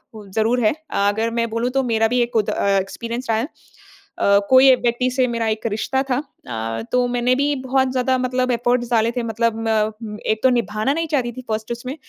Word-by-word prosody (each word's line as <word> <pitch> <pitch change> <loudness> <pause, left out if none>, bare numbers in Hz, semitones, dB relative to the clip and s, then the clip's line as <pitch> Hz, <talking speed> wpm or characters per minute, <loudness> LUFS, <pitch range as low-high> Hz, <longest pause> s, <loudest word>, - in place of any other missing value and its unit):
वो 210 -1 -10
ज़रूर 230 +3 +2
है। 215 - +4 0.2
अगर 205 +3 +1
मैं 230 0 0
बोलूँ 230 +2 -1
तो 270 0 +1
मेरा 225 -2 +2
भी 245 +2 0
एक 240 0 -1
खुद 215 -3 +1
अ, - - -1
एक्सपीरियंस 230 +6 -5
रहा 220 - +2
है। - - -1 0.6
अ, 200 0 +1
कोई 260 0 +8
व्यक्ति 245 +1 0
से 255 0 +1
मेरा 230 -1 -1
एक 220 +1 -2
रिश्ता 265 +5 -1
था। 250 - +2
अ, 115 - -6
तो 250 0 +3
मैंने 245 +1 +1
भी 285 +2 +1
बहुत 265 0 +2
ज़्यादा 260 0 +1
मतलब 255 0 0
एफ़र्ट्स 240 0 0
डाले 230 0 +3
थे 245 - 0
मतलब 230 0 0
म, 215 0 -1
एक 220 0 0
तो 260 - +5
निभाना 230 +1 0
नहीं 330 +2 -1
चाहती 240 -2 -1
थी 255 +2 -9
फ़र्स्ट 220 +1 -3
उसमें 255 +3 -5
235 Hz, 215 wpm, -21 LUFS, 220-255 Hz, 0.6 s, कोई